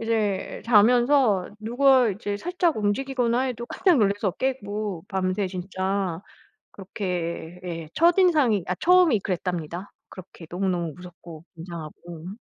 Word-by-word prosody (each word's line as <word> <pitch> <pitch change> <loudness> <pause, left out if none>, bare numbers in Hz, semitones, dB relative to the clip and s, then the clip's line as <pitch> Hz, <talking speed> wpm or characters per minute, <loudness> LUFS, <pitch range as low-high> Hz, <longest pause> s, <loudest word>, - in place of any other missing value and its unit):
이제 220 -4 -1
자면서 240 -2 +4
누가 250 +3 +4
이제 205 +1 -4
살짝 350 - 0
움직이거나 240 +3 0
해도 240 -3 -3
깜짝 360 -2 +2
놀라서 200 -1 +1
깨고 210 -8 -3
밤새 190 0 -1
진짜 190 -1 -3 0.5
그렇게 180 -3 -5
예 165 -3 -5
첫인상이 325 - +3
아 185 - -1
처음이 350 - +4
그랬답니다. 180 0 -4 0.2
그렇게 180 -2 -12
너무너무 175 -3 -1
무섭고 175 -2 -12
긴장하고. 170 +2 -9
200 Hz, 290 characters per minute, -25 LUFS, 180-245 Hz, 0.5 s, 자면서